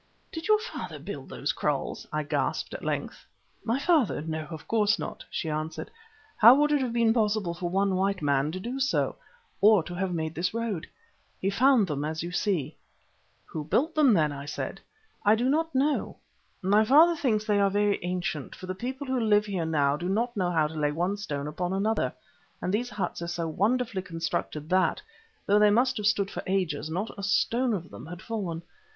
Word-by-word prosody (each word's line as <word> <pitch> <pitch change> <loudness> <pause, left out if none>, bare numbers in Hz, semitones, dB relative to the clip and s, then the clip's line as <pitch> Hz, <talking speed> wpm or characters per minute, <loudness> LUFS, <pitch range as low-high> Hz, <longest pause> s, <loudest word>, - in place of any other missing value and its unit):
"Did 325 0 -5
your 430 0 +6
father 445 +3 -6
build - - -8
those - - -2
kraals?" - - -2
I - - -1
gasped, - - -2
at - - -7
length. - - -3 0.4
"My 230 +3 0
father! 290 - +2
no, 160 -1 -4
of 160 -3 -9
course 215 -1 +2
not," - - -6
she 165 - -3
answered. 155 +1 -4 0.5
"How 235 +4 +9
would 295 +1 +3
it 295 -2 +3
have 255 -2 -1
been 230 -1 +3
possible 210 -6 +1
for 175 0 -4
one 195 +2 +1
white 195 +1 +1
man 140 +1 +2
to 185 - -4
do 245 +7 -4
so, 270 0 +1 0.5
or 205 -3 +6
to 175 - -8
have 185 +1 -2
made 160 -2 -2
this 175 +6 -2
road? 230 -8 -2 0.5
He 195 - 0
found 250 +1 +4
them 150 -4 -3
as 155 +1 -3
you 175 - -5
see." 175 -6 -1 0.7
"Who 155 - -5
built 280 - +1
them, 300 -5 +5
then?" 155 -4 +2
I 140 0 -7
said 145 +4 -4
again. - - -29 0.4
"I 210 +2 +5
do 245 +3 +1
not 320 +1 0
know. 285 +3 +1 0.5
My 205 +3 +4
father 315 +9 +6
thinks 220 -8 0
that 215 - +1
they 205 - +3
are 200 0 +4
very 205 -1 +1
ancient, 175 -5 -3
for - - -9
the 185 - -3
people 260 +8 -5
who 260 -1 0
live 210 -2 +3
here 190 -5 -2
now 145 -3 +2
do 175 +3 -3
not 235 +5 0
know 185 -4 0
how 160 -3 +2
to 150 - -4
lay 150 -2 0
one 175 +6 -1
stone 145 -9 -4
upon 175 +5 -3
another, 215 +3 0 0.5
and 185 - -2
these 240 +4 0
huts 205 -4 -4
are 170 - -3
so 170 -1 -2
wonderfully 220 +5 0
constructed 165 -4 -4
that, 185 0 +2 0.5
though 205 +1 +4
they 210 0 +6
must 250 +5 +3
have 210 -1 0
stood 200 -2 +1
for - - -4
ages, 170 -6 -1
not 185 +7 -3
a - - -4
stone 230 +4 +1
of 175 -2 -7
them - - -10
had 175 +2 -9
fallen. 185 -8 -4
195 Hz, 210 wpm, -27 LUFS, 165-230 Hz, 0.7 s, How